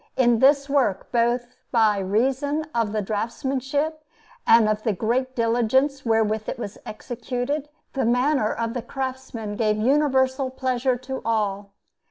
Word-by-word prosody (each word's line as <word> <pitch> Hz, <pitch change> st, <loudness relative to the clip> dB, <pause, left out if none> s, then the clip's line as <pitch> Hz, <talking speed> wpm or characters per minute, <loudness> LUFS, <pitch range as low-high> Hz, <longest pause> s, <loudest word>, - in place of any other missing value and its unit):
In 240 Hz, -3 st, +4 dB
this 275 Hz, +2 st, +4 dB
work, 265 Hz, -9 st, 0 dB
both 240 Hz, +1 st, 0 dB
by 220 Hz, -4 st, +3 dB
reason 265 Hz, +10 st, 0 dB
of 230 Hz, -3 st, 0 dB
the 215 Hz, -1 st, -1 dB
draughtsmanship 265 Hz, +8 st, -2 dB, 0.5 s
and 225 Hz, -1 st, +6 dB
of 215 Hz, 0 st, 0 dB
the 220 Hz, -1 st, 0 dB
great 250 Hz, +6 st, -1 dB
diligence 245 Hz, +4 st, +1 dB
wherewith 220 Hz, -1 st, +1 dB
it -, -, -4 dB
was 210 Hz, -4 st, -7 dB
executed, 245 Hz, +6 st, -4 dB, 0.2 s
the 270 Hz, -, 0 dB
manner 245 Hz, 0 st, +2 dB
of 230 Hz, 0 st, -2 dB
the 245 Hz, -, -3 dB
craftsman 260 Hz, -5 st, -5 dB
gave 215 Hz, -1 st, +1 dB
universal 265 Hz, +1 st, +2 dB
pleasure 255 Hz, -1 st, 0 dB
to 260 Hz, +1 st, -6 dB
all. 205 Hz, -3 st, -1 dB
245 Hz, 140 wpm, -24 LUFS, 220-265 Hz, 0.5 s, and